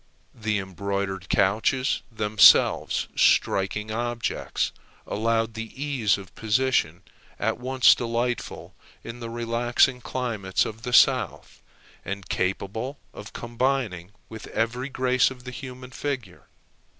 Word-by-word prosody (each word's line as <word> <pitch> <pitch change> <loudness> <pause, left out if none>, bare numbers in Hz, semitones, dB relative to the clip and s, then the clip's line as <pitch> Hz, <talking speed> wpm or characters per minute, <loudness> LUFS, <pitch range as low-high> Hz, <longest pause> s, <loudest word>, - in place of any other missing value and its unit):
The 110 -2 -1
embroidered 95 -1 -4
couches, 110 +6 +1
themselves 105 -1 +4
striking 105 +3 +2
objects, 120 0 -2 0.3
allowed 115 +1 0
the 115 +3 -8
ease 135 -9 +1
of 95 -1 -12
position 110 -7 0 0.3
at - - -1
once 130 0 +5
delightful 120 +1 -3 0.3
in 115 +1 -8
the 115 -1 -6
relaxing 120 +2 +1
climates 110 -8 -1
of 110 +1 -7
the 125 +1 -5
South, 120 - +3 0.4
and 100 -2 -6
capable 100 - -2 0.2
of 105 - -10
combining 120 -7 -2 0.2
with 110 -1 -9
every 125 +4 -2
grace 130 -1 +2
of 125 -2 -11
the 125 - -7
human 125 +1 -9
figure. 130 -12 -5
115 Hz, 115 wpm, -25 LUFS, 100-125 Hz, 0.4 s, once